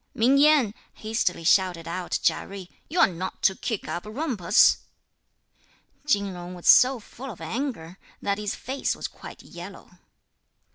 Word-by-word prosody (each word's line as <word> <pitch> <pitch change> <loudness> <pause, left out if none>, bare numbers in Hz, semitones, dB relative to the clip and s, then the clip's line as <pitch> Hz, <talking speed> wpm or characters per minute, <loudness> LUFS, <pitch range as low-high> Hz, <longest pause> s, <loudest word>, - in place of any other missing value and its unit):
"Ming 260 +5 +4
Yen," 290 -8 +4 0.2
hastily 215 -6 -2
shouted 175 -1 +2
out 175 +1 -2
Chia - - +1
Jui, 195 -2 -9 0.2
"you're 340 +4 +5
not 185 +1 -6
to 190 - +5
kick 215 +2 -4
up 175 - -4
a 210 - -10
rumpus." 225 - +3 1.3
Chin 200 -8 +2
Jung 175 0 -8
was 175 - -8
so 255 0 +7
full 255 +5 -10
of 210 - -9
anger 185 - -5 0.2
that 200 0 -2
his 210 -1 -3
face 265 +2 -3
was - - -5
quite - - -12
yellow. - - -12
205 Hz, 150 wpm, -25 LUFS, 180-255 Hz, 1.3 s, so